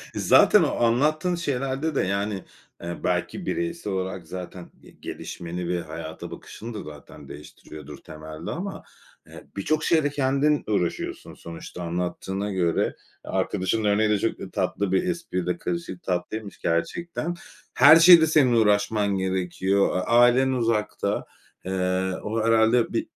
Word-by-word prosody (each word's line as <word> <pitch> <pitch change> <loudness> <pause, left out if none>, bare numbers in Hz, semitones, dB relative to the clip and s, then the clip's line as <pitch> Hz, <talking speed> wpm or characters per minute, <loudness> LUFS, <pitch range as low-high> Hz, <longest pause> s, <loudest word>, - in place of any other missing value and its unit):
Zaten - - +5
o - - 0
anlattığın 155 +9 +1
şeylerde 140 -1 -2
de - - +2
yani, 100 +1 -2 0.4
eee, 85 0 -5
belki 90 - -2
bireysel 170 - -3
olarak 95 -3 -4
zaten 90 0 -8
ge - - -16
gelişmeni 85 +1 -7
ve 90 -1 -1
hayata 80 0 -8
bakışını 115 +1 -9
da 105 - -6
zaten 75 -1 -12
değiştiriyordur 75 -1 -11
temelde 80 +1 -9
ama 190 +4 -5 0.4
eee - - -13
birçok 155 +10 -1
şeyde 155 -3 +2
kendin 140 +1 +1
uğraşıyorsun 100 -5 -2
sonuçta 85 +1 -9
anlattığına 90 +4 -3
göre. 85 -3 +1 0.4
Eee, - - -7
arkadaşının 110 +4 -1
örneği 105 +1 +2
de 105 -2 +2
çok - - -1
da - - -7
tatlı 100 -2 -1
bir 95 - +2
espriyle 90 - -2
karışık 170 - -5
tatlıymış 95 +3 -4
gerçekten. 170 - -2 0.4
Her 145 +5 +8
şeyde 165 -1 +8
senin 140 -6 +4
uğraşman 105 -2 +2
gerekiyor. 95 +1 0
A - - 0
ailen 120 +3 +4
uzakta. 115 -4 -1 0.4
Eee, 95 0 -1
o 110 +1 -2
herhâlde 115 +1 +3
bir - - -1
105 Hz, 135 wpm, -25 LUFS, 90-135 Hz, 0.4 s, Her